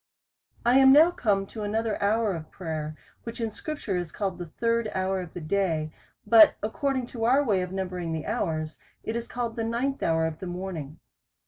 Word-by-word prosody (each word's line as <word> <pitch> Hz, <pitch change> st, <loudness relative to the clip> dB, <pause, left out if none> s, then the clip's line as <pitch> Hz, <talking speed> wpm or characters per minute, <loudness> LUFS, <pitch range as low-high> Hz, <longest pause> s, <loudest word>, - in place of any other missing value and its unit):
I 245 Hz, +3 st, +6 dB
AM 265 Hz, 0 st, +8 dB
now 310 Hz, +5 st, +7 dB
come 200 Hz, -, 0 dB
to 215 Hz, +2 st, -8 dB
another 215 Hz, +1 st, -1 dB
hour 215 Hz, 0 st, +2 dB
of 160 Hz, -2 st, -7 dB
prayer, 155 Hz, -3 st, -5 dB, 0.2 s
which 230 Hz, +1 st, -7 dB
in 225 Hz, -1 st, -1 dB
scripture 290 Hz, -5 st, -4 dB
is 175 Hz, -2 st, -3 dB
called 195 Hz, -4 st, -3 dB
the 175 Hz, -, -5 dB
third 230 Hz, +6 st, 0 dB
hour 190 Hz, 0 st, 0 dB
of 175 Hz, -3 st, -10 dB
the 175 Hz, -, -5 dB
day; 160 Hz, -3 st, -1 dB, 0.3 s
but 215 Hz, 0 st, +7 dB
according 260 Hz, +4 st, -1 dB
to 225 Hz, -2 st, -2 dB
our 265 Hz, +5 st, +4 dB
way 205 Hz, -8 st, +1 dB
of 180 Hz, 0 st, -4 dB
numbering 180 Hz, -3 st, -3 dB
the 160 Hz, -1 st, -3 dB
hours, 155 Hz, -1 st, -2 dB, 0.2 s
it 220 Hz, -, -3 dB
is 235 Hz, 0 st, -3 dB
called 235 Hz, -2 st, -3 dB
the 230 Hz, -, -2 dB
ninth 245 Hz, +5 st, -1 dB
hour 160 Hz, 0 st, +2 dB
of 160 Hz, -1 st, -4 dB
the 185 Hz, -, -6 dB
morning. 175 Hz, -5 st, -6 dB
200 Hz, 200 wpm, -27 LUFS, 170-230 Hz, 0.3 s, AM